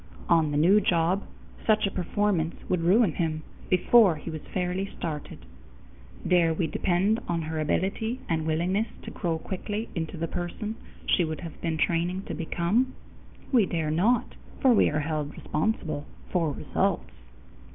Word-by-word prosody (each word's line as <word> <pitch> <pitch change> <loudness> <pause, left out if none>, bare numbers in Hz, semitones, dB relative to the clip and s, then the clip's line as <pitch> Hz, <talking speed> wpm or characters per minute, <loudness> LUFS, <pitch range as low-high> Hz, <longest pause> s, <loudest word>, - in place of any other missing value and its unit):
On 165 -3 +4
the 145 - -1
new 190 +8 +5
job, 175 +1 +2 0.4
such 215 -1 +3
a 195 - -1
performance 180 -2 0
would 180 -2 +1
ruin 190 +3 +4
him 155 -1 -2 0.3
before 190 0 +5
he 155 +2 -7
was 155 -1 -5
fairly 185 +1 -1
started. 150 - -5 0.8
Dare 170 -3 +4
we 170 - 0
depend 190 +6 +1
on 170 -1 -1
her 160 0 -3
ability 195 - -1
and 160 -1 -1
willingness 180 +7 +1 0.2
to - - -7
grow 170 -4 -1
quickly 205 +6 -4
into 165 0 -4
the 165 +1 -2
person 175 +6 -4 0.3
she 180 - +3
would 160 -1 -3
have 170 -3 -9
been 165 -2 -1
training 175 +4 0
to - - -6
become? 185 +10 0 0.6
We 235 -8 +4
dare 160 -3 -1
not, 210 +10 +2 0.3
for 260 -3 +5
we 215 - +5
are 150 0 0
held 150 -1 -2
responsible 155 -4 -2 0.2
for 165 -4 +1
results! 65 - -1
175 Hz, 155 wpm, -27 LUFS, 160-195 Hz, 0.8 s, new